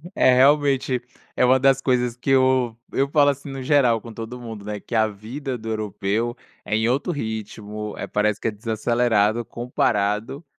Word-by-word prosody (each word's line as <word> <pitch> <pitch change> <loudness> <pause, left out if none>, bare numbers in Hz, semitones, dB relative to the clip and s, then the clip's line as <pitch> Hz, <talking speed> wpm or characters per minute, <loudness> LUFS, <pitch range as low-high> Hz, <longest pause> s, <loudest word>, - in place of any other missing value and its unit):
É, 130 - +5
realmente, 135 -2 +3 0.3
é - - +2
uma 130 +1 +5
das 135 0 +3
coisas 125 -3 +1
que 125 +2 -5
eu 130 -3 +3 0.2
eu 140 +1 +1
falo 145 -1 +4
assim, 140 +1 -8
no 135 -1 -6
geral, 125 -5 +3
com 115 0 -10
todo 115 +3 -7
mundo, 115 -4 -8
né, 105 0 -4
"Que 120 - -6
a 110 -1 +4
vida 125 +6 -6
do 115 -1 -10
europeu 110 +2 -2 0.3
é 105 - -1
em 110 +1 +1
outro 140 +8 0
ritmo, 105 -4 -5
eh, - - -5
parece 105 0 0
que - - -2
é - - -4
desacelerado 115 0 +1
comparado 115 +3 -1
120 Hz, 180 wpm, -23 LUFS, 110-130 Hz, 0.3 s, É